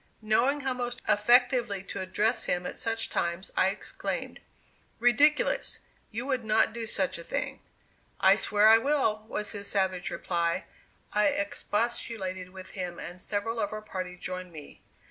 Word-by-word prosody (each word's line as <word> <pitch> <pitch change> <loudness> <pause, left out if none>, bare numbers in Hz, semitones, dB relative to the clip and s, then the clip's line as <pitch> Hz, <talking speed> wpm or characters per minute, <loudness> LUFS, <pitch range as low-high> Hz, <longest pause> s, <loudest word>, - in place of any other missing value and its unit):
Knowing 250 +7 +2
how 265 -1 0
most 245 -1 -4
effectively 240 -2 +4
to 195 - -5
address 190 +4 0
him 180 0 0
at - - -4
such 225 -1 -1
times, 170 +2 -2
I 185 - +4
exclaimed. 195 +2 -4 0.6
"Ridiculous! 300 - +3 0.3
you 230 +3 -4
would 260 -3 0
not 215 0 +3
do 230 -1 -4
such 190 -4 -1
a - - -7
thing." 275 +5 -3 0.6
"I 190 0 +7
swear 210 0 +3
I 225 +1 +8
will," 225 -6 +1
was 210 -1 -3
his 200 -1 -6
savage 190 -2 0
reply. 170 -2 -1 0.5
I 210 0 +4
expostulated 200 -2 -2
with 185 0 -11
him, 180 -2 -5
and 175 +1 -8
several 225 +4 -2
of 205 - -1
our 215 0 -5
party 185 -3 -5
joined 185 0 -6
me. 155 -3 -11
210 Hz, 155 wpm, -29 LUFS, 185-240 Hz, 0.6 s, I